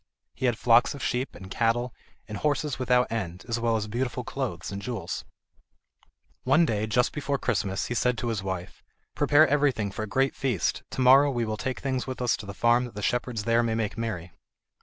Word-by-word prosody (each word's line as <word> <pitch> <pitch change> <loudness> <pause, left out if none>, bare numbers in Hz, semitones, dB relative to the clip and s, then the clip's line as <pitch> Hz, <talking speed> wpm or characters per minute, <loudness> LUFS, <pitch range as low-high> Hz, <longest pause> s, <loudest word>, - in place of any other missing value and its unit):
He 130 - -1
had 120 -3 +1
flocks 120 +4 +4
of 140 - -7
sheep, 125 +2 -2
and 95 -1 -11
cattle, 120 +3 0 0.3
and 105 -1 -6
horses 145 -2 0
without 125 -1 +2
end, 95 -6 -4
as 115 -1 -1
well 115 -1 +1
as 110 -2 -1
beautiful 125 +3 -2
clothes 115 -11 -4
and 100 0 -5
jewels. 120 -2 -4 1.2
One 145 +6 +4
day, 110 -6 -1
just 125 +3 +1
before 140 -1 -1
Christmas, 100 -6 -1
he - - -3
said 125 +1 +1
to 120 - -2
his 110 -4 -1
wife: 95 -2 -5 0.3
"Prepare 155 +2 +5
everything 140 -8 +1
for 105 - -5
a 110 - -3
great 135 +6 +1
feast, 125 - -1
to - - -3
morrow 135 +3 +7
we 120 -4 -1
will 110 -1 -2
take 125 +6 -4
things 130 -2 -2
with 130 - -5
us 125 -2 +2
to 105 - -9
the 100 - -7
farm 120 +3 +3
that 120 - -10
the 105 - -5
shepherds 120 -2 -1
there 115 +1 +3
may 115 -1 0
make 110 -3 -2
merry." 105 -7 -4
120 Hz, 210 wpm, -27 LUFS, 105-130 Hz, 1.2 s, morrow